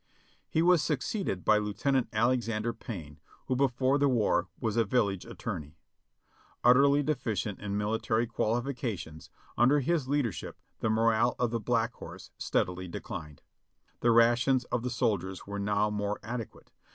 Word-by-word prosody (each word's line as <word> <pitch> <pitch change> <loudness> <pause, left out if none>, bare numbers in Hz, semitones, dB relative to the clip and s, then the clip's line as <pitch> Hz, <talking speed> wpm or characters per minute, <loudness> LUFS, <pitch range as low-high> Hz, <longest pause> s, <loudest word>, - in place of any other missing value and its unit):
He 160 - +2
was 175 -2 +5
succeeded 150 - -2
by 105 0 +5
Lieutenant 115 +6 0
Alexander 115 -1 0
Payne, 85 -10 -8 0.3
who 130 - 0
before 130 +1 +2
the 140 0 +3
war 105 -7 +2
was 110 -3 -1
a 115 - +4
village 100 -4 0
attorney. 75 +1 -6 0.9
Utterly 140 +4 +5
deficient 115 - -2
in 100 -1 -3
military 110 +2 0
quali 115 +1 0
fications, 115 - -5 0.3
under 130 +5 +5
his 145 0 0
leadership 140 -5 -2 0.2
the 110 - 0
morale 115 +2 +3
of 120 -2 0
the 115 - -1
Black 115 +1 0
Horse - - -11
steadily 90 +1 -1
declined. 75 -3 -7 0.6
The 120 - +2
rations 120 +3 +4
of 125 - 0
the 125 - -2
soldiers 100 -7 -1
were 100 0 -5
now 105 +1 +1
more 105 0 -2
adequate. 115 +1 -7
115 Hz, 145 wpm, -30 LUFS, 105-125 Hz, 0.9 s, was